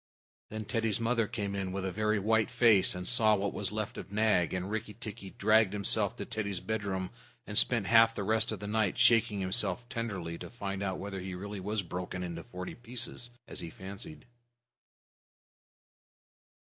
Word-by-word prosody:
Then 110 Hz, 0 st, -5 dB
Teddy's 115 Hz, -2 st, 0 dB
mother 115 Hz, -1 st, +1 dB
came 100 Hz, -4 st, -3 dB
in 95 Hz, -2 st, -2 dB
with 95 Hz, 0 st, -3 dB
a 95 Hz, -, -1 dB
very 105 Hz, +2 st, +1 dB
white 110 Hz, +2 st, +2 dB
face, 110 Hz, -7 st, +5 dB
and 90 Hz, 0 st, -2 dB
saw 110 Hz, -3 st, +7 dB
what 100 Hz, -1 st, -1 dB
was 100 Hz, -1 st, -2 dB
left 110 Hz, -1 st, -3 dB
of -, -, -9 dB
Nag, 105 Hz, -5 st, +2 dB
and 90 Hz, +2 st, -3 dB
Rikki 105 Hz, -1 st, -4 dB
tikki 105 Hz, -3 st, -7 dB
dragged 110 Hz, 0 st, +3 dB
himself 100 Hz, -1 st, 0 dB
to -, -, -5 dB
Teddy's 100 Hz, -4 st, -2 dB
bedroom 100 Hz, -4 st, -3 dB, 0.3 s
and 105 Hz, -, -7 dB
spent 115 Hz, -1 st, +4 dB
half 115 Hz, +1 st, +6 dB
the 100 Hz, -, -2 dB
rest 110 Hz, +2 st, +2 dB
of 110 Hz, -, -4 dB
the 105 Hz, -, -6 dB
night 105 Hz, -2 st, +1 dB
shaking 115 Hz, -3 st, +4 dB
himself 115 Hz, +5 st, -1 dB
tenderly 100 Hz, -10 st, -4 dB
to -, -, -7 dB
find 100 Hz, -4 st, -4 dB
out 95 Hz, -2 st, -1 dB
whether 100 Hz, -1 st, -5 dB
he 95 Hz, 0 st, -5 dB
really 100 Hz, +2 st, -6 dB
was 105 Hz, +2 st, -2 dB
broken 90 Hz, +1 st, -5 dB
into 85 Hz, -2 st, -5 dB
forty 90 Hz, 0 st, -7 dB
pieces, 120 Hz, 0 st, -7 dB, 0.2 s
as -, -, -4 dB
he 85 Hz, -, -4 dB
fancied. 95 Hz, -4 st, -8 dB
105 Hz, 180 wpm, -31 LUFS, 95-110 Hz, 0.3 s, saw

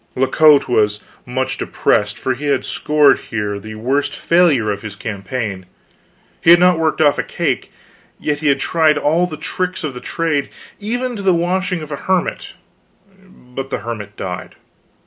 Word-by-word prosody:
La 130 Hz, -, +2 dB
Cote 150 Hz, +2 st, +5 dB
was 105 Hz, -4 st, +2 dB, 0.3 s
much 130 Hz, +1 st, -2 dB
depressed, 105 Hz, 0 st, 0 dB
for 130 Hz, -, -1 dB
he 145 Hz, +4 st, -5 dB
had 140 Hz, -2 st, +1 dB
scored 150 Hz, -2 st, +3 dB
here 105 Hz, -3 st, -4 dB
the 110 Hz, +1 st, -9 dB
worst 130 Hz, +6 st, -1 dB
failure 155 Hz, -11 st, +3 dB
of 100 Hz, 0 st, -4 dB
his 110 Hz, -2 st, -7 dB
campaign. 105 Hz, -1 st, -4 dB, 0.8 s
He -, -, +3 dB
had 170 Hz, 0 st, +9 dB
not 180 Hz, -2 st, +4 dB
worked 160 Hz, -1 st, 0 dB
off 145 Hz, -2 st, +4 dB
a -, -, +1 dB
cake; -, -, -2 dB, 0.5 s
yet 150 Hz, -1 st, -1 dB
he 155 Hz, -, -1 dB
had 140 Hz, -1 st, +3 dB
tried 155 Hz, 0 st, +2 dB
all 165 Hz, +5 st, +2 dB
the 155 Hz, -, -7 dB
tricks 185 Hz, +2 st, -3 dB
of 150 Hz, -3 st, -3 dB
the 125 Hz, -, -8 dB
trade, 160 Hz, -4 st, -1 dB, 0.3 s
even 245 Hz, +4 st, -2 dB
to -, -, -5 dB
the 190 Hz, -2 st, +3 dB
washing 180 Hz, 0 st, -1 dB
of 155 Hz, -, -10 dB
a 140 Hz, -, -3 dB
hermit; 185 Hz, -1 st, -1 dB, 0.7 s
but 135 Hz, -7 st, -9 dB
the -, -, -3 dB
hermit 105 Hz, -3 st, -6 dB
died. 90 Hz, -1 st, -6 dB
145 Hz, 175 wpm, -18 LUFS, 115-170 Hz, 0.8 s, had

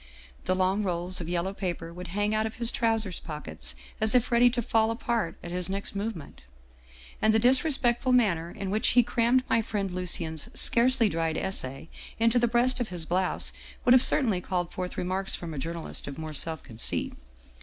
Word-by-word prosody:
The 185 Hz, -, +1 dB
long 190 Hz, +2 st, +1 dB
rolls 180 Hz, -1 st, 0 dB
of 165 Hz, -, -6 dB
yellow 175 Hz, +2 st, -1 dB
paper 175 Hz, -4 st, -4 dB
would 180 Hz, +1 st, -8 dB
hang 205 Hz, +3 st, -1 dB
out 215 Hz, +1 st, +1 dB
of 220 Hz, -, -8 dB
his 235 Hz, -1 st, +2 dB
trousers 225 Hz, -5 st, 0 dB
pockets 80 Hz, -, -7 dB, 0.3 s
as 220 Hz, +2 st, +3 dB
if 250 Hz, 0 st, +2 dB
ready 240 Hz, +1 st, +6 dB
to 240 Hz, 0 st, -2 dB
fall 220 Hz, 0 st, +2 dB
apart 225 Hz, -6 st, -2 dB
at 175 Hz, -, -7 dB
his 180 Hz, 0 st, -2 dB
next 200 Hz, +1 st, -4 dB
movement. 200 Hz, -6 st, -5 dB, 0.8 s
And 220 Hz, 0 st, +4 dB
the -, -, +5 dB
disre 260 Hz, +7 st, +4 dB
spectful 250 Hz, -1 st, +2 dB
manner 190 Hz, -10 st, +2 dB
in 190 Hz, +2 st, -5 dB
which 215 Hz, +4 st, +1 dB
he 245 Hz, -, +8 dB
crammed 245 Hz, +2 st, +2 dB
my 230 Hz, -, +2 dB
friend 200 Hz, -3 st, -3 dB
Lucien's 170 Hz, -3 st, -2 dB
scarcely 240 Hz, 0 st, +4 dB
dried 165 Hz, -3 st, -1 dB
essay 135 Hz, -7 st, -2 dB, 0.3 s
into 230 Hz, +2 st, +3 dB
the 240 Hz, -, +2 dB
breast 245 Hz, +2 st, +2 dB
of 245 Hz, -, -1 dB
his 175 Hz, -3 st, -3 dB
blouse 180 Hz, +2 st, 0 dB, 0.3 s
would 245 Hz, -, +6 dB
have 255 Hz, -, +7 dB
certainly 225 Hz, -10 st, +3 dB
called 175 Hz, -1 st, -2 dB
forth 180 Hz, -1 st, -5 dB
remarks 190 Hz, +2 st, -2 dB
from 170 Hz, -2 st, -7 dB
a 145 Hz, -, -5 dB
journalist 165 Hz, +3 st, -4 dB
of 140 Hz, -, -7 dB
more 155 Hz, -1 st, -6 dB
self 160 Hz, +2 st, -2 dB
conceit. 115 Hz, 0 st, -3 dB
195 Hz, 195 wpm, -27 LUFS, 170-230 Hz, 0.8 s, he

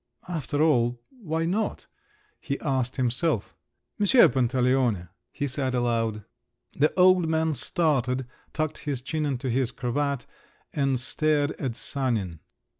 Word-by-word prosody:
"After 155 Hz, -3 st, -1 dB
all… 120 Hz, -6 st, +2 dB
why 165 Hz, -, -3 dB
not?" 205 Hz, +6 st, -1 dB, 0.5 s
he 140 Hz, -3 st, -3 dB
asked 130 Hz, -3 st, -1 dB
himself. 125 Hz, -, 0 dB, 0.5 s
"M. 205 Hz, -, +2 dB, 0.2 s
Pantaleone!" 125 Hz, -6 st, +1 dB, 0.2 s
he 145 Hz, -, -3 dB
said 130 Hz, -1 st, -2 dB
aloud. 115 Hz, -3 st, 0 dB, 0.5 s
The 150 Hz, +2 st, +3 dB
old 180 Hz, -2 st, +6 dB
man 160 Hz, 0 st, +1 dB
started, 130 Hz, -5 st, 0 dB, 0.3 s
tucked 155 Hz, -1 st, -2 dB
his 140 Hz, -4 st, -3 dB
chin 155 Hz, +1 st, -1 dB
into 135 Hz, -1 st, -2 dB
his 125 Hz, 0 st, +1 dB
cravat 140 Hz, +2 st, -2 dB, 0.5 s
and 135 Hz, -3 st, +1 dB
stared 145 Hz, +2 st, +1 dB
at 130 Hz, -5 st, -2 dB
Sanin. 110 Hz, -, -2 dB
135 Hz, 120 wpm, -26 LUFS, 125-155 Hz, 0.5 s, old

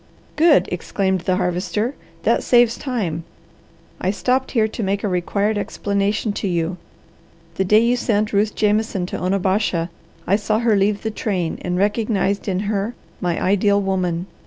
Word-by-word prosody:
"Good!" 315 Hz, -1 st, +5 dB
exclaimed 190 Hz, +1 st, -1 dB
the 180 Hz, +1 st, +1 dB
Harvester. 185 Hz, +6 st, -1 dB, 0.3 s
"That -, -, +3 dB
saves 240 Hz, -2 st, +4 dB
time. 200 Hz, -, -3 dB, 0.8 s
I 185 Hz, -, 0 dB
stopped 255 Hz, +6 st, 0 dB
here 220 Hz, -4 st, +2 dB
to 220 Hz, -, -6 dB
make 200 Hz, 0 st, -1 dB
a -, -, +1 dB
required 200 Hz, +3 st, 0 dB
explanation 205 Hz, +1 st, -1 dB
to -, -, -1 dB
you. 175 Hz, 0 st, -1 dB, 0.8 s
The 190 Hz, -, -1 dB
day 210 Hz, +4 st, +5 dB
you 240 Hz, +1 st, +3 dB
sent 215 Hz, -3 st, 0 dB
Ruth 205 Hz, +1 st, +1 dB
Jameson 210 Hz, -3 st, +1 dB
to -, -, -5 dB
Onabasha, 185 Hz, -2 st, 0 dB, 0.3 s
I 195 Hz, -, +3 dB
saw 215 Hz, 0 st, 0 dB
her 230 Hz, -1 st, +2 dB
leave 200 Hz, +1 st, +1 dB
the 220 Hz, -, -1 dB
train 185 Hz, -6 st, -2 dB
and 180 Hz, 0 st, -2 dB
recognized 205 Hz, 0 st, 0 dB
in 190 Hz, -1 st, 0 dB
her 205 Hz, +2 st, -2 dB, 0.2 s
my 175 Hz, -2 st, -1 dB
ideal 200 Hz, +1 st, +3 dB
woman. 185 Hz, -3 st, -1 dB
200 Hz, 160 wpm, -21 LUFS, 185-215 Hz, 0.8 s, Good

